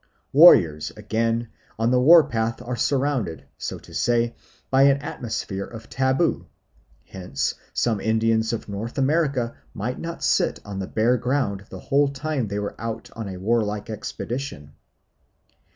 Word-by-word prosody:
Warriors, 85 - +7
again, 115 +1 -1 0.3
on 115 +2 +1
the 125 0 +3
war 165 +4 +8
path 115 -4 -2
are 125 +1 -3
surrounded, 125 - -1
so - - -4
to - - -15
say, 120 0 +1 0.4
by 135 0 +4
an 140 0 +5
atmosphere 110 -7 -4
of 115 -1 -11
taboo; 130 - +1 0.6
hence 80 -7 -3 0.2
some 110 -4 0
Indians 110 0 +1
of 115 - -4
North 105 +5 -5
America 135 -4 +1 0.2
might 115 +5 -3
not 165 0 -6
sit - - +2
on 100 -1 -6
the 95 - -4
bare 120 +3 +2
ground 125 -6 -1
the 95 - -8
whole 140 +7 +2
time 140 -2 -2
they 100 0 -4
were 105 0 -3
out 115 0 -5
on 115 -3 -5
a 95 - -6
warlike 105 +1 -1
expedition. 110 - -5
115 Hz, 150 wpm, -24 LUFS, 105-130 Hz, 0.6 s, war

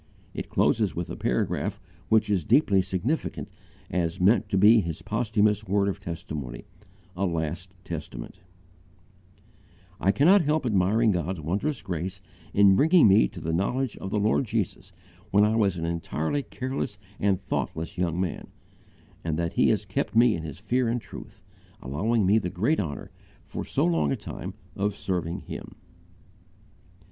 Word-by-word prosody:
It - - -5
closes - - +2
with - - -4
a - - -4
paragraph 60 +1 -1 0.3
which 110 -1 +4
is 100 -5 +1
deeply 100 - +4
significant 105 - -2 0.4
as 85 -2 -1
meant 100 +6 +3
to 95 - +1
be 105 +4 +7
his 85 -4 -4
posthumous 105 -1 +1
word 100 +1 +2
of 100 - -2
testimony 75 -7 -6 0.5
"a 95 +2 0
last 85 +2 -3
testament": 80 -1 -7 1.6
"I 95 - +3
cannot 170 - +5
help 150 -1 0
admiring 105 +1 +3
God's 90 0 -2
wondrous 100 - -2
grace 90 0 -4 0.3
in 100 -1 +6
bringing 160 - +6
me 95 -11 +6
to - - -10
the 80 - -3
knowledge 125 +8 0
of 95 - -6
the 105 - -1
Lord 105 +5 +2
Jesus 100 -4 -3 0.4
when 100 0 +4
I 110 +1 +2
was 100 -5 +2
an 80 - -3
entirely 85 - -2
careless 130 -6 -4 0.2
and 100 -2 +2
thoughtless 80 0 -3
young 85 -1 0
man, 90 -3 -3 0.8
and 80 -2 -1
that 85 0 -1
He - - +3
has - - +1
kept - - -2
me 120 +2 +6
in 85 - -3
His 75 -3 -7
fear 120 +6 0
and 120 +2 0
truth, - - -12 0.4
allowing 100 - 0
me 105 +4 +4
the 90 - -3
great 110 - +1
honour, 75 -7 -4 0.3
for - - -5
so - - 0
long 80 -4 +2
a - - +1
time, - - -7 0.2
of 100 0 -1
serving 90 -4 -3
Him." - - -8
95 Hz, 160 wpm, -26 LUFS, 85-110 Hz, 1.6 s, be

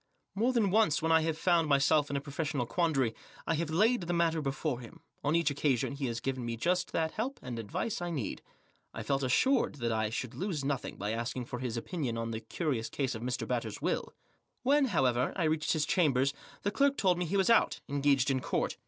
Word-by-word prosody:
More 230 +6 +2
than 225 -6 +2
once 210 -7 +4
when 165 - +2
I 160 0 +6
have 160 -1 -1
found 170 -1 +3
my 140 - +5
self 145 +1 +3
in 140 - -2
a - - +1
professional 140 -2 -2
quandary 135 -5 +1 0.3
I - - +1
have 160 0 -1
laid 215 +9 +3
the 175 0 -2
matter 165 -2 +2
before 140 -1 -2
him; 120 -2 -12 0.2
on 145 +3 +2
each 170 -3 +2
occasion 140 -2 0
he 140 -1 -3
has 115 -1 -3
given 130 +1 -3
me 115 -1 -3
just 175 +7 0
that 160 -1 0
help 250 +6 -3
and 120 -2 -5
advice 115 - -3
I 175 - -2
needed. 140 -11 -3 0.5
I 115 - -4
felt 135 +5 0
assured 235 - +2
that 120 -4 -2
I 110 -1 0
should 120 +2 -4
lose 155 0 -3
nothing 140 -3 -2
by 105 +1 -2
Asking 120 +2 -3
for 125 - -6
his 120 -2 -3
opinion 125 -2 -3
oft 115 0 -3
the 110 0 -4
fctiriotts 135 -9 -2
tase 135 -3 -1
of 110 - -6
Mr, 125 +1 -2
Batters' 115 -4 -2
will. - - -2 0.5
When* 280 +2 +4
however* 130 - +1
I 185 - 0
reached 155 -1 +1
his 155 -2 +1
chamber 145 -6 +3 0.4
the 205 - 0
clerk 280 +4 +2
told 185 -3 +3
tm 180 - 0
he 195 +5 0
was 195 +3 +3
out> 230 - +4
engaged 140 -1 +2
in 130 - +1
court. - - -1
145 Hz, 225 wpm, -31 LUFS, 125-170 Hz, 0.5 s, I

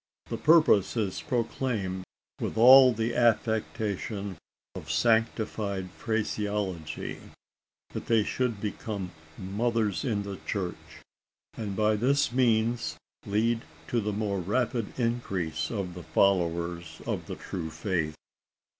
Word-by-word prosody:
The - - -1
purpose 150 - +5
is 100 -4 -1
proclaimed 115 -7 -2 0.3
with - - -3
all 130 +2 +9
the 115 +1 -1
affectation 110 -3 0 0.4
of 80 - -8
sanctified 105 +1 +1
phraseology: 105 -6 -2 0.7
that - - -6
they 115 -2 +4
should 120 -1 -1
become 100 -2 -4 0.3
"mothers 105 +2 0
in 110 -7 0
the 100 -1 -6
church," 95 -4 -5 0.5
and 105 -3 -4
by 110 +1 +2
this 135 +5 +2
means 115 -8 +1 0.3
lead 115 +3 +1 0.3
to 120 - +1
the 105 0 -1
more 100 -1 -1
rapid 110 +4 -1
increase 95 -10 -1
of 95 -5 -3
the 90 - -8
followers 85 -3 +1
of - - -3
the - - -4
true 85 -4 -5
faith! 80 -1 -2
105 Hz, 115 wpm, -28 LUFS, 95-115 Hz, 0.7 s, all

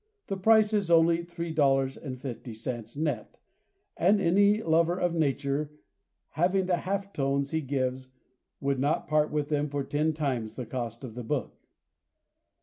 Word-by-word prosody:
The 195 - -3
price 215 +2 +4
is 200 -4 +1
only 165 0 +4
$3.50, 135 -7 -2
net, 145 -8 -2 0.6
and 200 +4 +3
any 200 +4 +3
lover 165 +2 +2
of 175 -1 +1
nature 145 -1 -1 0.6
having 185 +3 +1
the 180 -1 +1
half 200 +2 -3
tones 140 0 0
he 160 - 0
gives 130 -2 -2 0.5
would 140 -1 0
not 145 +4 0
part 150 0 +2
with 150 -1 -2
them 150 -1 0
for 140 0 -2
ten 150 +3 0
times 130 -8 -2
the 125 - -5
cost 120 0 -5
of 125 -4 -7
the 125 +1 -6
book. 135 +1 -2
150 Hz, 145 wpm, -28 LUFS, 135-170 Hz, 0.6 s, price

